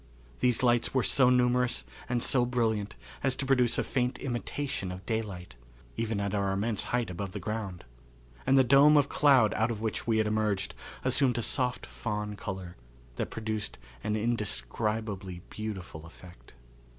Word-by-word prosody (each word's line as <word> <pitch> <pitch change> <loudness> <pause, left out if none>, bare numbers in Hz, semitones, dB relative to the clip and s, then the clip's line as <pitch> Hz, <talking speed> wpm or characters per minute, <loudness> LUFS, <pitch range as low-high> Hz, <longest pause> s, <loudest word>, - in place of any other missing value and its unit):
These 125 -1 +2
lights 120 +1 +3
were 130 - +3
so 130 -2 +4
numerous 125 0 +2 0.2
and 120 -1 +1
so 125 -2 +3
brilliant 110 -4 0 0.3
as 135 -2 +1
to 135 - -3
produce 125 -3 +3
a - - +1
faint 125 -1 -1
imitation 130 -4 -3
of 90 +1 -8
daylight, 100 - -3 0.4
even 110 -2 -1
at 100 0 -2
our 100 -1 +1
immense 105 +1 -1
height 120 -5 -1
above 90 +1 -5
the - - -4
ground, 105 -5 -4 0.6
and 135 - +5
the 135 - +7
dome 140 +4 +7
of 145 -1 +3
cloud 135 -7 +5
out 110 +2 +1
of 115 -3 -3
which 110 +1 -2
we 115 -1 +3
had 110 - +3
emerged 105 -2 0 0.3
assumed 130 -1 +3
a 120 - 0
soft 125 -1 0
fawn 105 -2 -4
color 95 -3 -6 0.4
that - - -2
produced 110 -2 -4 0.3
an 105 - 0
indescribably 105 -4 -2
beautiful 95 -7 -6
effect. 85 -8 -15
110 Hz, 160 wpm, -29 LUFS, 100-125 Hz, 0.6 s, the